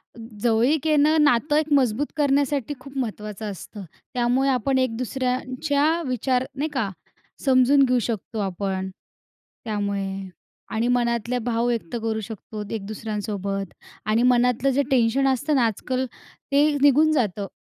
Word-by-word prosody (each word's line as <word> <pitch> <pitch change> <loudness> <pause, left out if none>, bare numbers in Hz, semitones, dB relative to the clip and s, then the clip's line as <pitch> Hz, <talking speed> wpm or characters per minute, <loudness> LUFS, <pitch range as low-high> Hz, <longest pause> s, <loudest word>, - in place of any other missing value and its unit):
अ, - - -13 0.2
जवळीक 245 +7 +2
येणं, 305 +1 +4
नातं 295 +2 +3
एक 310 0 0
मजबूत 265 0 +2
करण्यासाठी 285 -1 +1
खूप 275 +1 -11
महत्त्वाचं 215 -3 -4
असतं. 200 +1 -9 0.3
त्यामुळे 250 +3 +2
आपण 265 +1 +1
एक 255 -3 0
दुसऱ्यांच्या 265 +5 0
विचार 255 +1 0
नाही 295 +4 -2
का, 225 -7 0 0.6
समजून 265 +1 +5
घेऊ 250 -1 +2
शकतो 220 -1 -4
आपण 190 0 -2 0.8
त्यामुळे. 200 -2 -3 0.4
आणि 225 +2 0
मनातले 240 0 +1
भाव 235 0 -1
व्यक्त 235 -3 -2
करू 220 -1 -1
शकतो 215 0 -7
एक 205 -3 -5
दुसऱ्यांसोबत. 205 -3 -4 0.3
आणि 220 +3 +2
मनातलं 250 +1 +3
जे 285 - +3
टेन्शन 260 +2 +3
असतं 280 +3 +1
ना 245 -3 +4
आजकाल, 255 +4 -2 0.5
ते 290 +2 +4
निघून 295 +2 +5
जातं 210 -8 0
245 Hz, 135 wpm, -24 LUFS, 215-275 Hz, 0.8 s, समजून